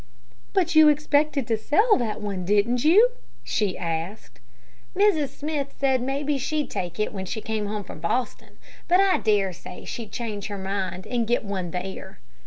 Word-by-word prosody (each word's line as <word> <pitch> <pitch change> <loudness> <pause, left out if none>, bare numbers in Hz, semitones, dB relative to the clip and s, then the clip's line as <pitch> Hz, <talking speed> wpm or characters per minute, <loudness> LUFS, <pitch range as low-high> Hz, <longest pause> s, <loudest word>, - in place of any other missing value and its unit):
"But 355 -3 +2
you 315 -1 +8
expected 295 -2 +2
to 225 0 0
sell 415 - +3
that 220 -3 -3
one, 200 -3 -3
didn't 210 +6 +2
you?" 415 +11 +6 0.3
she 205 -4 -1
asked. 170 +5 -5 0.6
"Mrs. 375 -7 +3
Smith 290 0 -4
said 265 -2 +2
maybe 275 +2 -1
she'd 300 +3 -2
take 175 +1 -4
it 215 - 0
when 190 -2 -5
she 220 - -3
came 215 -1 -3
home 210 0 -3
from - - -10
Boston, 245 +9 -3 0.3
but 360 +2 +4
I 390 -1 +4
dare 205 -4 +2
say 180 - -10
she'd 225 -4 -6
change 215 -4 -4
her 205 -1 -5
mind 190 -1 -3
and 235 -2 -1
get 240 -1 +1
one 190 -3 -3
there." 190 +2 -6
225 Hz, 175 wpm, -25 LUFS, 195-295 Hz, 0.6 s, you